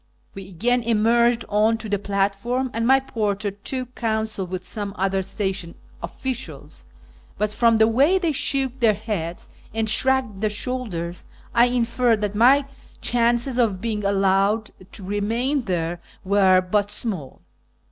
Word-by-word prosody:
We 195 -1 -9
again 245 +7 +1
emerged 235 +1 +2
on 215 +2 +2
to 225 - -6
the 205 -1 -1
platform, 205 +6 -1
and 230 +1 -1
my 265 +1 +6
porter 210 -6 -2
took 250 +5 -5
counsel 220 -4 -2
with 185 0 -5
some 205 -3 -5
other 195 0 0
station 190 -3 -3 0.3
officials; 260 -1 -6 0.5
but 210 0 0
from 230 +1 +3
the 220 0 +5
way 275 +11 +4
they 345 -4 0
shook 270 -2 -1
their 225 -3 +4
heads 195 -6 -5 0.2
and 225 0 0
shrugged 250 -3 +1
their 215 - +1
shoulders 205 -7 -4 0.3
I 235 0 +6
inferred 240 -2 +1
that 205 -1 -1
my 260 +6 +5 0.3
chances 240 +1 +1
of 210 -6 +2
being 215 0 -3
allowed 200 +2 +2 0.2
to 200 - -7
remain 230 +8 -1
there 175 -2 -2 0.2
were 190 -1 +4
but 205 +2 0
small. 195 - -4
220 Hz, 145 wpm, -23 LUFS, 195-240 Hz, 0.5 s, my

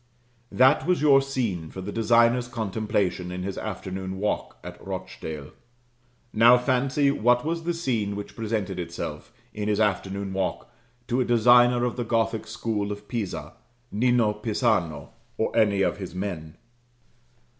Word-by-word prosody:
That 130 +5 +4
was 180 -1 +2
your 140 -2 +6
scene 115 -12 -3
for 95 - -9
the 95 +2 -5
designer's 115 +2 +3
contemplation 105 -5 -2
in 90 0 -5
his 95 0 -4
afternoon 95 -2 -5
walk 105 +2 -2
at - - -10
Rochdale. 75 -2 -6 0.8
Now 120 +3 +7
fancy 135 +3 +1
what 125 -1 +2
was 165 +1 -2
the 175 - 0
scene 115 -11 -1
which 100 0 -7
presented 105 -5 -3
itself, 85 - -6 0.2
in 105 0 -4
his 105 -1 +1
afternoon 100 -2 -1
walk, 95 -1 -3 0.3
to 125 +2 +1
a - - +3
designer 120 +1 +5
of 125 - -3
the 120 - -1
Gothic 115 -1 -1
school 110 -3 -2
of 105 0 -7
Pisa 115 -6 -4 0.4
Nino 120 -1 +2
Pisano, 105 - -1 0.3
or 110 - -1
any 105 -3 +3
of - - 0
his 95 -3 -7
men. 85 -5 -5
110 Hz, 145 wpm, -25 LUFS, 95-120 Hz, 0.8 s, Now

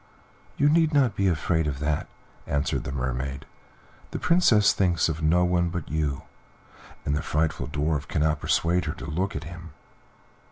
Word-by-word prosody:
"You 145 - +3
need 160 0 +3
not 130 -7 +3
be 100 - +1
afraid 80 -1 +1
of 70 -2 -2
that," 75 +1 -1 0.4
answered 70 0 -1
the 65 - -4
Mermaid, 65 +1 -3 0.6
"the - - -4
Princess 125 - +4
thinks 90 -4 +2
of 80 0 -3
no 85 +3 +3
one 90 -1 +1
but 85 -2 -5
you, 75 -3 -2 0.8
and 70 - 0
the 75 - -1
frightful 75 -1 -1
Dwarf 75 0 -1
cannot 75 0 +1
persuade 85 +2 +1
her - - -2
to 65 - -9
look 90 +6 -2
at - - -4
him." 85 -2 -10
80 Hz, 165 wpm, -26 LUFS, 75-90 Hz, 0.8 s, Princess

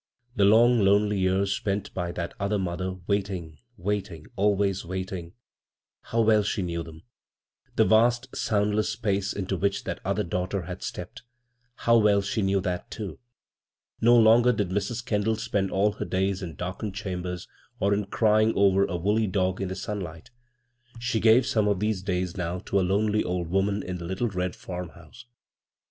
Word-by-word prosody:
The 100 - +4
long, 115 +4 +6
lonely 100 0 +3
years 95 +1 +1
spent 100 0 -3
by 90 -2 -3
that 85 -1 -4
other 100 +1 0
mother 90 0 -3
wait 100 0 0
ing, 85 -5 -7 0.2
waiting, 95 -4 -3
always 100 -1 +1
wiuting 95 -1 -5 0.4
— - - -68
how 115 - +3
well 110 -1 +4
she 100 -1 -1
knew 85 -1 -3
them 80 0 -11
I 120 - -49
The - - +4
vast, 120 +3 +3
soundless 105 0 +1
space 100 -3 -1
into 95 -1 -3
which 100 +2 -1
that - - -4
other - - 0
daughter 90 +2 -2
had - - -7
stepped - - -6 0.3
— 125 0 -45
how 115 0 +6
well 100 -2 +4
she 105 +2 -1
knew 95 0 +2
that, 90 -1 -3
too 105 -4 -6 0.8
I - - 0
No 120 +1 +7
longer 115 +2 +6
did 105 -5 -1
Mrs. 105 +5 -2
Kendall 110 -1 +1
spend 105 -3 -1
all 100 +3 +2
her 105 - -5
days 95 +1 -1
in 85 -5 -6
darkened 95 +4 -5
chambers, 90 -3 -4 0.3
or 100 +1 +2
in 100 0 0
crying 110 +1 +3
over 100 0 +4
a 90 - -3
woolly 105 +5 +1
dog 95 -1 0
in 95 - -1
the 95 - -4
sunlight; 95 -6 -6 0.7
she 115 -1 -1
gave 115 +3 +5
some 110 -2 +1
of 100 -3 +1
these 105 -2 0
days 90 -2 -2
now 90 -1 -2
to 100 +1 -1
a - - +2
lonely 105 +3 +1
old 90 -2 -2
woman 100 +2 0
in 90 -1 -5
the 85 - -6
littie 95 +5 -2
red 90 -1 -2
farmhouse. 90 +5 -9
100 Hz, 185 wpm, -26 LUFS, 90-105 Hz, 0.8 s, No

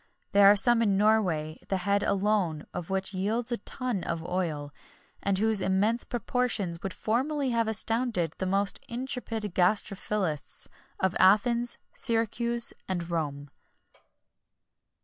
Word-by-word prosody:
There 200 0 +6
are 205 - +7
some 230 +3 +3
in 200 -4 +2
Norway, 185 -8 +1
the 195 - 0
head 200 +2 +1
alone 195 -6 0
of 180 0 -6
which 190 +1 -1
yields 220 +6 -1
a 240 - 0
tun 240 -2 -3
of 165 -1 -3
oil,[XXI 160 -6 -3
40] - - -42 0.5
and 200 -1 0
whose 220 0 +1
immense 205 +6 +1
proportions 235 -7 -1
would 195 - -4
formerly 265 +6 -1
have 230 -1 +1
astonished 220 - 0
the 190 - -1
most 200 +1 +1
intrepid 235 -4 -4
gastrophilists 190 -3 -1 0.3
of 190 -1 +1
Athens, 235 +5 +3 0.2
Syracuse, 235 +1 +3
and 175 -2 -3
Rome. 145 -4 -3
200 Hz, 130 wpm, -28 LUFS, 180-230 Hz, 0.5 s, are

